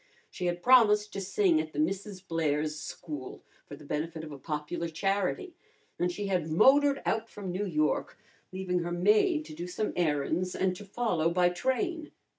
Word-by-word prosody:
She 180 - -3
had 175 0 -2
promised 210 -5 +5
to 195 - -3
sing 190 -4 +2
at 155 0 -8
the 145 - -4
Misses 190 +4 -2
Blair's 155 -3 -1
School 145 -1 -7 0.2
for 145 - -8
the 150 +1 -14
benefit 160 +2 -3
of 155 - -8
a 140 - -9
popular 155 +3 -3
charity, 200 - -1 0.5
and 175 0 +1
she 205 +3 -4
had 180 -5 -1
motored 275 - +5
out 225 0 -1
from 195 -3 -6
New 200 +3 -2
York, 155 -3 0 0.3
leaving 185 -1 -1
her 175 0 -3
maid 215 - +3
to - - -10
do 170 +3 -6
some 210 +4 -2
errands 165 +2 0
and 185 -1 0
to 205 - -10
follow 195 -6 0
by 175 +1 +3
train. 300 - -1
180 Hz, 180 wpm, -29 LUFS, 160-210 Hz, 0.5 s, promised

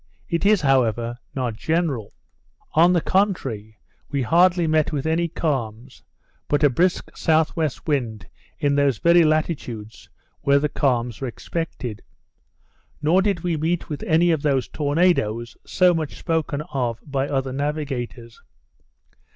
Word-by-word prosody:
It 170 +3 0
is, 210 -3 +4
however, 120 -4 +1 0.2
not 125 -4 -1
general. 150 -3 -2 0.6
On 170 +3 +5
the 175 -2 +2
contrary, 135 - -1 0.3
we 140 -2 -1
hardly 175 +6 +4
met 155 -1 +2
with 145 -2 -3
any 165 +2 +1
calms; 130 -7 -3 0.5
but 145 0 +1
a 145 - +5
brisk 180 +8 0
S.W. 160 -1 +1 0.2
wind 115 - -2 0.3
in 145 -1 +1
those 140 -4 +2
very 170 +5 +5
latitudes 145 -9 -2 0.3
where 140 0 +4
the 150 +1 0
calms 125 -6 -1
are 135 - -2
expected. 125 -4 -5 1.0
Nor 160 +5 +3
did 195 -4 0
we 175 -1 -1
meet 165 +3 -1
with 150 - -5
any 170 +1 +4
of 160 -3 0
those 135 -4 +1
tornadoes, 145 -8 0
so 180 -1 +4
much 160 -3 -3
spoken 160 -3 -1
of 120 -4 -1
by 140 -2 -1
other 135 -2 -1
navigators. 135 -5 -4
145 Hz, 135 wpm, -22 LUFS, 125-165 Hz, 1.0 s, On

